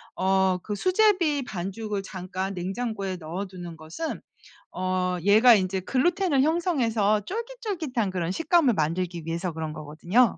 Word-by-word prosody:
어 190 -1 +2
그 210 - -3
수제비 365 - +3
반죽을 200 0 -4
잠깐 185 +1 -4
냉장고에 195 +1 -3
넣어두는 175 +1 -6
것은 160 - -5 0.5
어 185 0 -1
얘가 220 +5 +7
인제 190 -1 0
글루텐을 290 - +2
형성해서 240 - +2
쫄깃쫄깃한 380 - -3
그런 180 -2 -2
식감을 325 - +3
만들기 170 +1 -1
위해서 170 +2 -2
그런 160 -1 -4
거거든요. 160 +10 +2
195 Hz, 320 characters per minute, -26 LUFS, 180-275 Hz, 0.5 s, 얘가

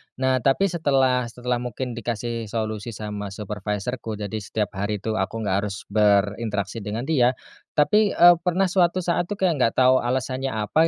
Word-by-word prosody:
Nah, 130 0 +1
tapi 155 +10 +2
setelah 130 -6 +2
setelah 125 +1 -3
mungkin 125 +1 -4
dikasih 115 0 -4
solusi 110 0 -4
sama 105 -1 -5
supervisorku, 105 +3 -4
jadi 105 +1 -4
setiap 105 0 -3
hari 105 +2 -2
itu 110 -2 -1
aku 110 +4 -2
gak 95 -2 +1
harus 100 -2 -7
berinteraksi 105 0 +1
dengan 110 +3 -4
dia. 130 -5 +2 0.4
Tapi, 205 +7 +3
eee, 175 0 +8
pernah 180 +1 +1
suatu 180 -1 +2
saat 175 0 0
tuh, 205 - -3
kayak 180 -7 +1
gak 115 -2 +2
tau 130 0 +5
alasannya 130 +1 -2
apa 110 +10 +2
120 Hz, 165 wpm, -23 LUFS, 105-135 Hz, 0.4 s, eee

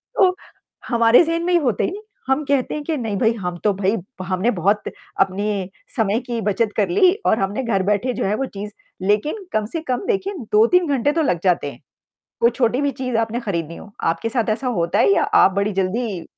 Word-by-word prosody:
तो, 370 -2 +4 0.5
हमारे 235 +4 +5
ज़हन 335 +1 -1
में 355 0 +3
होता 245 -9 0
ही - - +1
नहीं, 410 +3 -7 0.3
हम 265 +3 +1
कहते 275 -3 0
हैं 300 - -4
के 315 +1 -2
नहीं 220 -6 -3
भई 225 +1 +2
हम 180 -5 -4
तो 210 -2 +3
भई 195 +3 0
भ 190 0 -10
हमने 190 +6 +1
बहुत 200 +3 +1 0.4
अपने 195 0 -1 0.3
समय 220 -1 +2
की 235 -1 -2
बचत 210 +2 +1
कर 200 -4 +2
ली 360 - +4
और 220 - +3
हमने 200 +7 -1
घर 195 -5 0
बैठे 210 +6 0
जो - - -2
है 205 +2 +1
वो 270 - -1
चीज़ 205 +1 -5 0.4
लेकिन 300 - 0
कम 215 -1 +1
से 325 - -2
कम 255 +9 -1
देखिए 395 -2 -1 0.2
2-3 325 +12 +4
घंटे 280 0 +1
तो 320 +2 0
लग 180 - +1
जाते 170 -6 +1
हैं, - - -15 0.6
कोई 235 - +5
छोटी 245 +1 +1
भी 285 - +1
चीज़ 255 -2 -3
आपने 230 +2 -1
खरीदनी 170 -7 -3
हो। 205 - -12
आपके 165 +7 0
साथ 230 -1 0
ऐसा 235 +5 -2
होता 170 +5 0
है 395 - +5
या - - +2 0.2
आप 190 - +4
बड़ी 200 +1 +1
जल्दी 195 0 -2
225 Hz, 220 wpm, -21 LUFS, 195-265 Hz, 0.6 s, हमारे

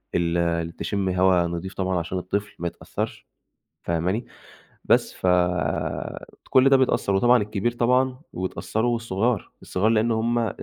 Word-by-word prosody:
ال 85 -1 0
تشم 100 -2 -1
هوا 90 -1 +3
نضيف 85 +3 -5
طبعًا 95 -1 -1
عشان 90 +2 -4
الطفل 100 +3 -3
ما 85 - -2
يتأثرش، - - -5 0.6
فاهماني، 90 +7 -1 0.6
بس - - +3
ف - - -3 1.2
كل 135 0 +5
ده 135 - +6
بيتأثر، 125 -6 +1
وطبعًا 120 +3 +5
الكبير، 105 +2 -1
طبعًا 125 +2 +1
ويتأثروا 110 +5 -1
والصغار، 115 -1 -1
والصغار 100 +4 0
لإن 115 +1 +2
هُم 115 +2 +1
لمّا 115 -2 0
100 Hz, 135 wpm, -24 LUFS, 90-120 Hz, 1.2 s, ده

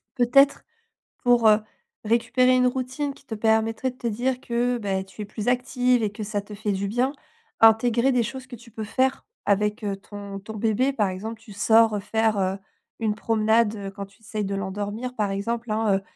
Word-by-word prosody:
Peut-être 275 +3 +4 0.6
pour, 240 -2 +4
heu, 210 0 +5 0.5
récupérer 245 +3 +3
une 250 0 +4
routine 260 +3 -2
qui - - -20
te 235 - -6
permettrait 220 +3 +1
de 255 - -22
te 240 - -10
dire 245 +4 -1
que, 245 +1 0
beh, 195 -3 -2
tu 190 +2 -11
es - - -7
plus 210 +2 -6
active 250 -1 +2
et 205 - 0
que 210 - -9
ça 205 0 -2
te 210 +1 -12
fait 210 0 -2
du 195 0 -1
bien. 245 +6 0 0.5
Intégrer 235 +3 +5
des 250 - +2
choses 260 +3 -6
que 250 - -8
tu 235 +1 -16
peux 220 0 -6
faire 260 +4 0 0.2
avec, 210 +1 +1
heu, 200 -1 -1
ton 200 0 -8
ton 215 +3 -9
bébé. 230 +6 +1
Par 210 -6 +1
exemple, 220 +5 -6
tu 225 - -14
sors 220 0 +4
faire, 220 -1 +1
heu, 190 0 0 0.4
une 215 -2 0
promenade, 220 0 +2
heu, 200 -2 -6
quand 200 0 -7
tu 200 +3 -24
essayes 215 -1 -4
de 195 - -3
l'endormir 205 +5 -4
par 210 -4 0
exemple, 230 +3 -3
hein, 215 -2 +2
heu. - - -6
220 Hz, 205 wpm, -24 LUFS, 205-245 Hz, 0.6 s, heu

